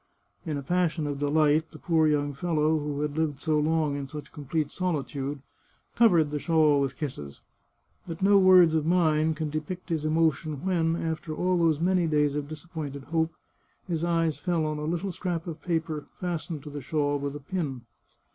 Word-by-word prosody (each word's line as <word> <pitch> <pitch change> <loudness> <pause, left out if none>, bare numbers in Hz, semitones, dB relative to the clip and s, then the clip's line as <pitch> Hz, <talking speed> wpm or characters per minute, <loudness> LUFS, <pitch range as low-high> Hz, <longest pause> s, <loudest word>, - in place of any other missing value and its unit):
In 150 -2 -1
a 140 - -5
pas 175 +3 +1
sion 160 -3 -3
of 145 -1 -3
delight 150 +2 +2
the - - -12
poor 160 -3 +2
young 145 -1 +1
fellow, 155 +1 +1
who 145 -1 -3
had 150 -1 -2
lived 155 -3 -1
so 155 0 +1
long 155 -1 +1
in 140 -1 -4
such 150 +1 -8
complete 150 +1 -2
solitude, 145 -5 -3 0.5
covered 175 -11 +4
the 150 - -2
shawl 155 -3 +3
with 135 -1 -2
kisses. 75 - -6 0.7
But 165 +2 -5
no 200 0 +6
words 185 -3 +7
of 160 -1 +2
mine 160 -2 +2
can 155 -1 -3
depict 155 +5 -5
his 160 -3 -1
emotion 155 -1 0
when, 165 -3 +1
after 160 -2 -3
all 180 +1 +1
those 160 -3 +3
many 180 0 +2
days 150 -2 +2
of 145 -1 -3
disappointed 155 -3 -7
hope, 160 0 0 0.5
his 165 -2 -2
eyes 165 -2 +1
fell 170 -3 0
on 155 0 -2
a 150 - -3
little 175 +4 -2
scrap 175 -1 -3
of 165 -3 -7
paper, 160 -3 -2
fastened 170 -4 -4
to 150 - -8
the 145 0 -6
shawl 145 +1 0
with 140 0 -4
a - - -5
pin. 145 -4 -4
155 Hz, 190 wpm, -27 LUFS, 145-165 Hz, 0.7 s, words